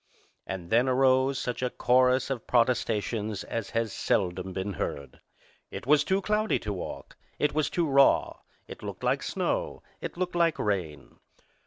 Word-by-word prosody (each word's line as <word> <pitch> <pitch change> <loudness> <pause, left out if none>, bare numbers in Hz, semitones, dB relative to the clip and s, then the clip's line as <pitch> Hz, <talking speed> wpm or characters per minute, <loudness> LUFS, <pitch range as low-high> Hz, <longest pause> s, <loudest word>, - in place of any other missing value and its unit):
And 90 -3 -6
then 120 +3 +4
arose 130 +1 +3
such 125 -2 -3
a 125 - 0
chorus 130 +1 +2
of 125 -4 -4
protestations 110 -3 0
as 115 -3 -4
has 115 -2 -1
seldom 95 -2 -1
been 95 +2 -3
heard. 70 -4 -5 0.5
It - - -7
was 150 +2 +4
too 190 0 0
cloudy 210 +1 +1
to 105 - -4
walk. 90 - -7 0.2
It 150 - +1
was 155 0 +1
too 170 -2 0
raw. 140 -1 +4 0.3
It - - -10
looked - - -7
like - - +1
snow. - - -2 0.2
It - - -6
looked 180 0 -2
like 170 -2 +2
rain. 85 -9 -3
125 Hz, 160 wpm, -28 LUFS, 100-140 Hz, 0.5 s, then